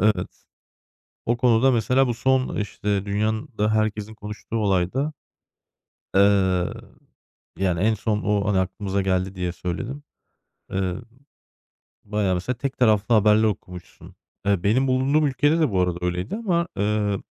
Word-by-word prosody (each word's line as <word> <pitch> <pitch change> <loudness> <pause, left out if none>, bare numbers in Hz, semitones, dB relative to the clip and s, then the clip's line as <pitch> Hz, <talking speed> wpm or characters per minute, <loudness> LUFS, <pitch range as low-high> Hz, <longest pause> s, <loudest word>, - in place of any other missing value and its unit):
Evet. 105 -3 0 0.8
O 120 +1 +1
konuda 125 +1 +4
mesela 125 +3 +2
bu 120 - 0
son, 130 +2 +1
işte, 100 -1 -2
dünyanın 110 +5 -1
da 105 +1 +1
herkesin 110 0 -1
konuştuğu 105 +1 -8
olayda, 105 - 0 1.0
eee, 100 - +6 1.4
yani, 90 -3 0
en 110 +1 +3
son 105 0 -1
o, 105 -1 +1
hani, 95 -2 +2
aklımıza 95 +1 -2
geldi 95 0 -1
diye 90 -1 -2
söyledim. 120 +12 -5 0.7
Eee, 95 -2 -1 1.1
bayağı 105 -2 0
mesela 120 +8 -2
tek 135 0 -4
taraflı 110 -1 +3
haberler 105 +1 +5
okumuşsun. 90 -4 -5 0.3
Eee, 100 -2 +1
benim 125 +7 +2
bulunduğum 135 +4 +2
ülkede 145 +4 +2
de 150 -8 +2
bu 95 - +1
arada 90 -1 0
öyleydi 90 - -2
ama, 175 -7 0
ııı, 105 -1 0
105 Hz, 135 wpm, -23 LUFS, 95-125 Hz, 1.4 s, eee